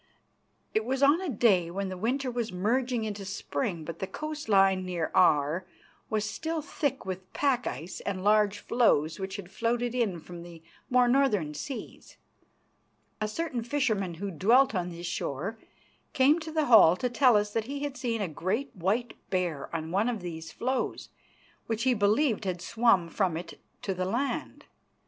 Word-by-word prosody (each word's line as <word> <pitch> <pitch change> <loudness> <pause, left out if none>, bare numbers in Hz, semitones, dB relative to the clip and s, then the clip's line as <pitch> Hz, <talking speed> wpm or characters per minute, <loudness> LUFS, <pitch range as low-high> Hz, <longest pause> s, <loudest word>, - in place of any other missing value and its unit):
It 220 - +2
was 265 +4 -1
on 290 +6 +5
a 370 - -3
day 200 -8 +3
when 195 +2 -3
the 185 - -5
winter 250 +7 -1
was 235 -2 -2
merging 235 +6 0
into 205 -2 -4
spring, 195 -2 -3
but 165 +1 -7
the 190 - -3
coast 305 +5 -6
line 195 -2 +4
near 175 -3 -2
Aar 165 -2 +3 0.5
was 215 -1 0
still 320 +9 -3
thick 285 -2 -2
with 185 0 -6
pack 265 -4 +1
ice 160 +8 -5
and 190 -2 -4
large 210 0 +3
floes 185 -10 +2
which 190 0 -4
had 190 -2 -8
floated 235 +3 -1
in 220 -8 0
from 175 +1 -10
the 170 -1 -12 0.3
more 250 -1 +4
northern 240 - +2
seas. 250 - -8 1.0
A 215 - +1
certain 250 0 -3
fisherman 225 - 0
who 200 +4 -4
dwelt 235 - +4
on 180 -3 -1
this 170 0 -8
shore 175 +5 -3 0.5
came 290 +3 +4
to 315 -1 -7
the 310 -1 +1
hall 220 - +7
to 250 - -1
tell 245 -1 +4
us 205 0 -1
that 225 -1 0
he 280 +3 -5
had 285 -2 -3
seen 240 -4 -2
a - - -1
great 195 - -3
white 205 +7 -1 0.2
bear 175 -6 -1
on 160 -1 -4
one 205 +6 +2
of 230 -5 -3
these 165 -2 -6
floes, 260 +2 -2 0.6
which, 225 0 -1
he 260 -1 +4
believed, 220 +2 +2
had 180 -2 -2
swum 200 -2 +2
from 175 -1 0
it 175 - -8 0.2
to 195 - -1
the 185 0 -2
land. 240 +9 -2
210 Hz, 175 wpm, -28 LUFS, 180-250 Hz, 1.0 s, hall